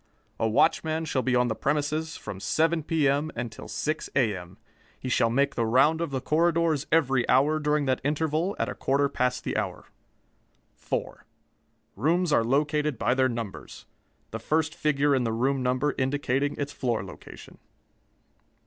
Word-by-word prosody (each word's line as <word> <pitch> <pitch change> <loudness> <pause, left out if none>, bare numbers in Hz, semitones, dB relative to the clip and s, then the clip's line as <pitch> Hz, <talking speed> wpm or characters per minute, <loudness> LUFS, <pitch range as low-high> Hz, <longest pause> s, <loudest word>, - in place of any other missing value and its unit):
A 115 - +2
watchman 160 +8 +2
shall 135 -4 0
be 125 -1 0
on 125 0 +3
the 115 - 0
premises 150 +5 -1
from 95 - -7
7 160 +11 +1
P.M. 150 -1 +1
until 115 -2 -6
6 155 +1 -3
A.M. 95 -8 -1 0.4
He 130 - -5
shall 115 -2 +2
make 140 +4 +1
the 115 - -1
round 140 +8 +3
of 170 - -1
the 135 -1 -2
corridors 160 0 +1
every 135 -6 +2
hour 145 +4 +4
during 150 -1 +1
that 130 -1 0
interval, 155 +5 0
at 115 - -1
a 125 - -4
quarter 140 +1 +1
past 125 -1 -1
the - - -3
hour. - - -3 0.9
4. - - -5 0.7
Rooms 170 +2 +1
are 115 - +4
located 150 +2 0
by 125 - +1
their 130 0 +2
numbers: 115 -4 -7 0.5
the - - -4
first 155 0 0
figure 145 -3 +1
in 130 -2 +2
the 115 - -1
room 130 +4 0
number 130 +3 0
indicating 135 +1 0
its 145 0 -4
floor 120 -7 -1
location. 95 - -12
140 Hz, 160 wpm, -26 LUFS, 125-155 Hz, 0.9 s, hour